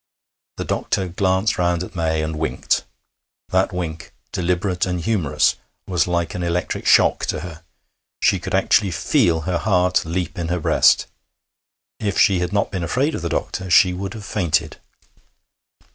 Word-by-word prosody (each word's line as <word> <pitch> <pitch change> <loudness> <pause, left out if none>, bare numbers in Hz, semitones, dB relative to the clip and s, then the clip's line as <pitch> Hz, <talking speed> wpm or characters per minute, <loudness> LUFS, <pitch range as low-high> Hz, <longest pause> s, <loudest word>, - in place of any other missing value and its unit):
The - - -4
doctor 95 -1 -1
glanced 95 +4 0
round 85 0 +1
at 90 - -10
May 80 -2 0
and 80 0 -3
winked. 80 - -1 0.6
That 95 +1 +1
wink, 85 -2 -5 0.2
deliberate 90 +1 -1
and 90 -1 -2
humorous, 85 -5 +1 0.3
was 90 -3 +1
like 85 -2 -1
an 90 - -4
electric 85 +1 -2
shock - - +4
to - - -2
her. 85 -2 -9 0.6
She 95 - +3
could 95 +2 -3
actually 95 +1 +3
feel 80 -1 +1
her 85 +2 -1
heart 90 -3 +2
leap 90 +2 -3
in 85 - -2
her 90 +1 -1
breast. - - +4 0.9
If 100 -2 -2
she 95 -3 +4
had 90 0 -2
not 100 -1 0
been 95 -3 -3
afraid 130 - 0
of - - -4
the 85 - -3
doctor, 95 +2 -3
she 90 +1 +5
would 95 +2 -5
have 105 -2 -8
fainted. 85 -6 -1
90 Hz, 160 wpm, -21 LUFS, 85-95 Hz, 0.9 s, she